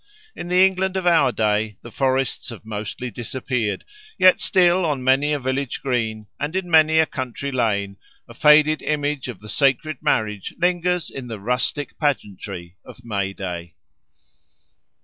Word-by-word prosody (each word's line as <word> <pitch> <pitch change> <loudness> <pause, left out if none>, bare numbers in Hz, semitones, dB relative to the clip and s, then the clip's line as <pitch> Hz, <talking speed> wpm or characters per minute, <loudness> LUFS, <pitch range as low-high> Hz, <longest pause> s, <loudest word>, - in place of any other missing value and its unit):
In 175 - -6
the 180 +1 +5
England 190 0 0
of 185 - -3
our 170 -7 +4
day 105 -2 0
the 120 - -10
forests 130 +1 -1
have 115 -2 -10
mostly 110 +3 -5
disappeared, 120 -2 -3 0.3
yet 185 0 +6
still 180 -1 +3
on 145 -6 -1
many 135 +3 +3
a 150 - +1
village 130 0 -2
green 115 -5 -1
and 150 +4 -3
in 185 -2 -2
many 160 0 +5
a 160 - +6
country 135 0 -5
lane 100 -6 -1 0.3
a 115 - -12
faded 150 +3 +5
image 145 -2 -1
of 125 - -8
the 105 - -11
sacred 140 +3 +1
marriage 105 -3 -1
lingers 180 -1 0
in 130 -2 -7
the 110 -3 -6
rustic 125 +6 -2
pageantry 100 - -3
of 125 - -14
May 100 -3 -2
Day. 85 -3 -6
130 Hz, 155 wpm, -22 LUFS, 110-155 Hz, 0.3 s, yet